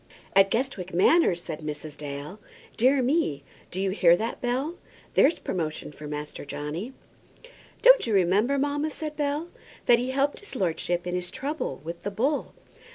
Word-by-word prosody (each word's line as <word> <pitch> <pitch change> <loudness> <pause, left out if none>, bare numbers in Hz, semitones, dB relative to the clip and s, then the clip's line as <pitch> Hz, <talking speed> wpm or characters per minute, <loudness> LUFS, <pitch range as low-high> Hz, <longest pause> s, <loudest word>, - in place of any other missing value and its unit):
"At 195 0 +6
Guestwick 200 -7 -2
Manor!" 250 - +5
said 170 -3 -7
Mrs. 150 -1 -6
Dale. 145 +6 -7 0.4
"Dear 260 +3 +4
me! 245 - +1 0.3
Do 185 - -5
you 195 0 +1
hear 175 -3 +5
that, 225 +4 -3
Bell? 265 +8 -1 0.3
There's 310 +4 +5
promotion 155 -4 -3
for 150 0 -9
Master 150 0 -5
Johnny!" 150 - -5 0.9
"Don't - - +7
you 225 - 0
remember, 200 +9 +3
mamma," 290 +2 0
said 305 0 -5
Bell, 295 +3 -1 0.4
"that 240 -1 +6
he 250 +1 -2
helped 275 +2 0
his 410 - -10
lordship 175 -3 -1
in 180 - -3
his 180 0 -1
trouble 280 - -4
with 170 +2 -6
the 205 - -3
bull?" 260 +9 -1
200 Hz, 160 wpm, -26 LUFS, 170-280 Hz, 0.9 s, Don't